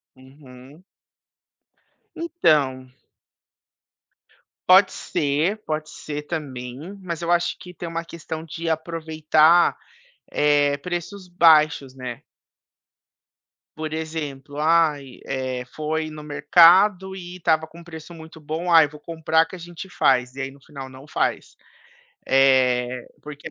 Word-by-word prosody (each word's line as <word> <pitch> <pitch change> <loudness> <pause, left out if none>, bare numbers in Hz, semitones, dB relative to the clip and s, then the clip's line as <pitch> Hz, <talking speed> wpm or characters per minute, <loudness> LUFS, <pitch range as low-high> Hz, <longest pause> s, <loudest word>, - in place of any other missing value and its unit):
Uhum. 130 +3 -16 1.3
Então 150 - +1 1.8
Pode 190 +1 +7
ser, 150 +8 -1
pode 155 0 -3
ser 150 -1 -7
também, 130 -6 -6 0.2
mas 170 -3 -5
eu 170 - 0
acho 175 0 +1
que 180 - -11
tem 175 -1 -7
uma 165 0 -4
questão 160 -1 -7
de 165 +1 -5
aproveitar, 160 0 +2 0.5
eh, 145 -1 +2
preços 180 +4 -6
baixos, 155 -6 +4
né. 125 -3 -7 1.5
Por 155 0 -5
exemplo: 150 -3 -5
"Ai, 150 -4 +1
eh, 130 -2 -3
foi 155 +1 -2
no 155 -1 -9
mercado 180 +6 +5
e 180 -1 -9
estava 160 -2 +1
com 170 +2 -14
preço 165 0 -11
muito 160 0 -12
bom, 160 +4 -3
ai, 160 -3 +7
vou 150 +1 -13
comprar 160 +1 +1
que 165 - -10
a - - -10
gente 175 +2 -9
faz", 125 -6 +1
e 135 - -5
aí 135 0 -4
no 140 - -18
final 135 -2 -10
não 130 +2 -14
faz, - - -2 0.7
eh, 125 -2 +3 0.2
porque 150 -1 -10
é - - -5
155 Hz, 125 wpm, -23 LUFS, 140-170 Hz, 1.8 s, Pode